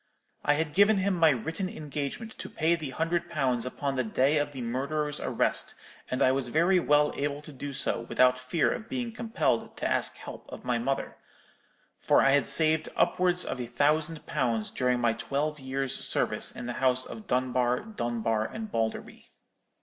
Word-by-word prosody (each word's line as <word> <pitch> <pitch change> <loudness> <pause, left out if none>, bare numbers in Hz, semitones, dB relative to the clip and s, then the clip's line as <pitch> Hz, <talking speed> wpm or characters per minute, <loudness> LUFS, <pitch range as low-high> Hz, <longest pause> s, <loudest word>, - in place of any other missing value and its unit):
I 145 - +3
had 150 0 -2
given 200 +4 +5
him 195 +1 +1
my 165 -3 +5
written 160 - -2
engagement 150 - -5
to - - -5
pay 160 +1 +1
the 160 -4 -3
hundred 165 +5 -1
pounds 130 -7 0
upon 140 +1 -3
the 130 - +1
day 135 +6 +2
of 145 0 -1
the 130 -3 -6
murderer's 145 +5 -2
arrest, - - 0 0.3
and 130 - +1
I 130 - +5
was 135 -1 0
very 170 +8 +3
well 150 -2 +3
able 145 0 -2
to 150 - -11
do 140 +2 -6
so 135 - 0
without 125 0 +4
fear 165 - +1
of 225 -1 -5
being 245 -3 -3
compelled 225 - -1
to - - -1
ask - - +1
help - - -10
of - - -10
my 120 -1 0
mother; 135 +3 -2 0.8
for - - +4
I 135 - +5
had 140 0 +3
saved 155 -1 +3
upwards 180 0 +2
of 125 - -4
a 120 - -4
thousand 150 +5 0
pounds 115 -3 -1
during 125 -1 +1
my 120 -1 +2
twelve 150 +5 -2
years' 135 0 -1
service - - +2
in - - -8
the 120 - -3
house 130 -1 +3
of 215 -3 -9
Dunbar, 125 -1 +1
Dunbar, 120 - -2
and 220 - -6
Balderby. 115 -1 -3
145 Hz, 185 wpm, -28 LUFS, 125-165 Hz, 0.8 s, given